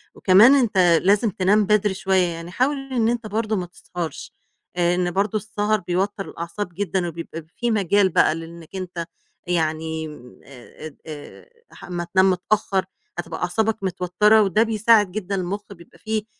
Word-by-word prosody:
وكمان 210 +9 +6
أنت 235 -7 +1 0.2
لازم 205 +4 +3
تنام 200 +3 +2
بدري 210 -1 +2
شوية، 190 -1 +1
يعني 170 0 -7
حاول 265 +8 +1 0.2
إن 230 -2 +2
أنت 235 -2 -2
برضه 215 +1 -1
ما 180 -3 -2
تسهرش. 175 -2 -7 0.4
آآ 175 0 +2
إن 175 -1 0
برضه 200 +3 0
السَهَر 215 0 -1
بيوتّر 190 +3 -2
الأعصاب 170 +4 -5
جدًا، 185 -1 -2
وبيبقى 165 -1 -7
في 240 -1 0
مجال 200 -2 +3
بقى 155 - +3
لإنّك 165 +1 -10
أنت 180 -2 -5 0.4
يعني 160 -2 -1
م 125 -5 -13
آآ 130 +2 -13
اد 155 - -9
آآ 150 -2 -10 0.2
أح - - -15
أمّا 175 -1 -4
تنام 190 0 +5
متأخّر 190 +1 0 0.3
هتبقى 175 - -5
أعصابك 215 +4 -1
متوتّرة 190 +4 +3
وده 210 +2 +3
بيساعد 220 -3 +3
جدًا 200 -1 -3
المُخ 190 +2 -3
بيبقى 170 -2 -18
في 220 -1 -3
190 Hz, 160 wpm, -22 LUFS, 175-210 Hz, 0.4 s, وكمان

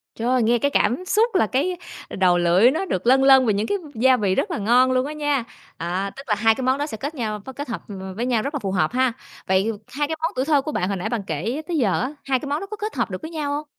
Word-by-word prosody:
Trời, 245 +2 +1
nghe 235 +2 +3
cái 285 +4 +1
cảm 270 +8 +1
xúc 440 +3 +2
là 220 - +3
cái 325 - 0 0.3
đầu 180 -2 +2
lưỡi 175 +8 +4
nó 325 +7 -2
được 210 - -3
lâng 265 +2 +5
lâng 265 -1 +7
vì 215 - +2
những 205 +2 -1
cái 405 - 0 0.2
gia 255 +3 +4
vị 200 -4 +1
rất - - -1
là - - -2
ngon 245 +5 +3
luôn 255 0 +1
á 295 - -5
nha. 290 -4 0 0.3
À, 185 +4 -2
tức 275 - -9
là 210 - +2
hai 225 +1 +3
cái 265 - -5
món 260 +1 +2
đó 290 - -1
sẽ 220 - -6
kết 285 +8 -5
nhau 215 -5 -3
kết 285 +2 -5
hợp 230 - -4
v 205 - -8 0.2
với 235 +4 -2
nhau 245 -3 +1
rất 280 - -3
là - - -1
phù 195 -5 -3
hợp 180 -5 +1
ha. 255 0 +1 0.3
Vậy 190 +4 +2 0.2
hai 290 +2 -2
cái 320 - -2
món 325 - 0
tuổi 260 +1 0
thơ 290 -2 +3
của 305 - -4
bạn 180 -9 -1
hồi 200 - -2
nãy 180 - -3
bạn 235 -3 -2
kể 220 - -2
tới 345 -2 -1
giờ 220 -9 +1
á, 255 +5 -3
hai 265 -2 +1
cái 290 - -7
món 290 - 0
đó 390 - -6
có 425 - -5
kết 425 0 -4
hợp - - -1
được - - -5
với 315 0 -7
nhau 300 -3 -3
hông? 300 +1 -4
255 Hz, 305 wpm, -22 LUFS, 210-290 Hz, 0.3 s, lâng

